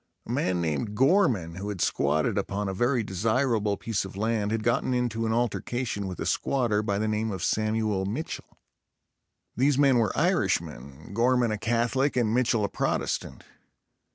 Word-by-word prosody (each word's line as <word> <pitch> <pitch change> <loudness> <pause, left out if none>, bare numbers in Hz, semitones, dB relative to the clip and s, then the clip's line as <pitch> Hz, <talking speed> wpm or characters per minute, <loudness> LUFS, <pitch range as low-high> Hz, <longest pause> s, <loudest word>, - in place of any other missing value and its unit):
A - - -6
man 90 -1 0
named 85 +6 -2
Gorman 125 - +2
who 100 +2 -4
had 100 -3 -5
squatted 75 -1 +1
upon 100 +1 -2
a 95 - -2
very 120 +4 +1
desirable 110 +1 0
piece 115 -4 -2
of 95 0 -9
land 110 -1 0
had 110 -1 -1
gotten 120 +2 +1
into 115 -2 -1
an - - 0
altercation 120 -2 -1
with 90 -2 -6
a - - -3
squatter 120 -6 +1
by 100 -2 -1
the 110 +1 0
name 110 +1 -1
of 95 -4 -4
Samuel 110 -2 0
Mitchell. 130 +11 -5 1.0
These 135 +2 +2
men 135 -3 +4
were 110 -4 +2
Irishmen, 70 +8 -1
Gorman 120 +1 +2
a 105 - -1
Catholic 120 +5 +1
and 115 -3 +2
Mitchell 120 -3 +2
a - - -3
Protestant. - - -2
110 Hz, 165 wpm, -27 LUFS, 100-120 Hz, 1.0 s, men